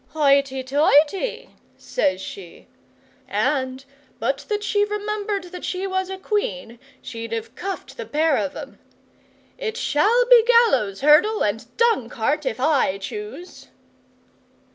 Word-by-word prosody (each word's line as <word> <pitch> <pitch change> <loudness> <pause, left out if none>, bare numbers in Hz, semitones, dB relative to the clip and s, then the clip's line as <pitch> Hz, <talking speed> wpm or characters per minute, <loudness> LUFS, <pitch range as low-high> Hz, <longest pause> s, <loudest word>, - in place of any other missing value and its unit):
"Hoity 275 -3 +2
toity!" 295 - +2 0.3
says 185 - -1
she, 190 -2 -10 0.6
and, 260 -2 -1 0.3
but - - -1
that 415 -1 -1
she 410 -1 +1
remembered 415 -2 -3
that 360 -1 -8
she 370 +1 -3
was 375 -1 -2
Queen, 235 - -2 0.2
she'd 230 -2 -7
have 225 0 -4
cuffed 385 +7 -6
the - - -5
pair 310 0 +2
of 285 +2 -2
'em. - - -9 0.8
"It 460 -2 -3
shall 460 +7 +2
be - - +7
gallows, 455 - +3
hurdle, 325 +10 +4
and 220 +3 -2
dung 455 - +2
cart 285 +6 -1
if 225 -2 -3
I 270 -9 +2
choose." 375 - -8
300 Hz, 125 wpm, -22 LUFS, 255-415 Hz, 0.8 s, be